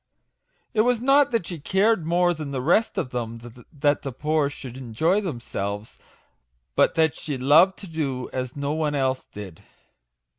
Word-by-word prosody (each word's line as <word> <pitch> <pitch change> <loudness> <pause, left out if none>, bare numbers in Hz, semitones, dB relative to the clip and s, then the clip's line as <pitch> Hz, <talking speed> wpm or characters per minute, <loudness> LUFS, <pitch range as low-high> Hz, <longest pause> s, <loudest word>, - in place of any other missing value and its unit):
" - - -45
It 215 - +4
was 245 0 +2
not 275 +3 +4
that 230 -7 0
she 170 -2 -6
cared 190 +2 +2
more 175 +1 +3
than 155 -3 -6
the 135 -2 -3
rest 175 - +2
of 125 - -2
them 115 -2 -4 0.3
that 145 -1 +1
the 135 - -5
poor 150 +2 0
should 130 -4 -9
enjoy 135 - 0
themselves, 110 - -5 0.8
but - - +3
that 160 -2 +3
she 145 -4 -5
loved 155 +9 +5
to 195 - -9
do 140 -6 -3
as 130 -1 -4
no 140 0 -2
one 155 -2 -1
else 130 -1 0
did. 95 -5 -9
150 Hz, 175 wpm, -24 LUFS, 130-175 Hz, 0.8 s, loved